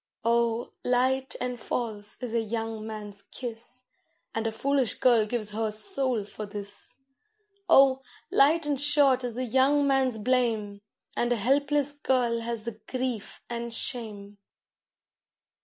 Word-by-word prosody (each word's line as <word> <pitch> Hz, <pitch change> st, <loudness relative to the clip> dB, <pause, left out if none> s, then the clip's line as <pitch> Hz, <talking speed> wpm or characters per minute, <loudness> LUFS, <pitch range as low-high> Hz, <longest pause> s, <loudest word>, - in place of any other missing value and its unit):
Oh! 235 Hz, 0 st, +1 dB
light 260 Hz, +2 st, +1 dB
and 250 Hz, -1 st, -3 dB
false 215 Hz, -3 st, -4 dB
is 240 Hz, -2 st, -4 dB
a 230 Hz, -, +2 dB
young 225 Hz, 0 st, -4 dB
man's 210 Hz, -2 st, -6 dB
kiss, 240 Hz, +2 st, -7 dB, 0.5 s
And 225 Hz, 0 st, -1 dB
a -, -, -1 dB
foolish 265 Hz, +2 st, +1 dB
girl 235 Hz, -4 st, +4 dB
gives 215 Hz, -2 st, -1 dB
her 220 Hz, +1 st, -1 dB
soul 255 Hz, -, +1 dB
for 210 Hz, +1 st, -7 dB
this. 200 Hz, -1 st, -3 dB, 0.7 s
Oh! 270 Hz, -4 st, +6 dB, 0.3 s
light 310 Hz, +3 st, +4 dB
and 285 Hz, -2 st, -1 dB
short 285 Hz, -3 st, +4 dB
is 240 Hz, -2 st, -2 dB
the 255 Hz, +1 st, -2 dB
young 270 Hz, +4 st, +3 dB
man's 265 Hz, -4 st, +2 dB
blame, 220 Hz, -3 st, 0 dB, 0.3 s
And 240 Hz, 0 st, 0 dB
a -, -, +4 dB
helpless 285 Hz, +5 st, +2 dB
girl 255 Hz, -5 st, 0 dB
has 230 Hz, -1 st, -3 dB
the 225 Hz, -2 st, -6 dB
grief 250 Hz, -5 st, -4 dB
and 235 Hz, -1 st, -5 dB
shame. 205 Hz, -5 st, -4 dB
235 Hz, 140 wpm, -27 LUFS, 220-265 Hz, 0.7 s, Oh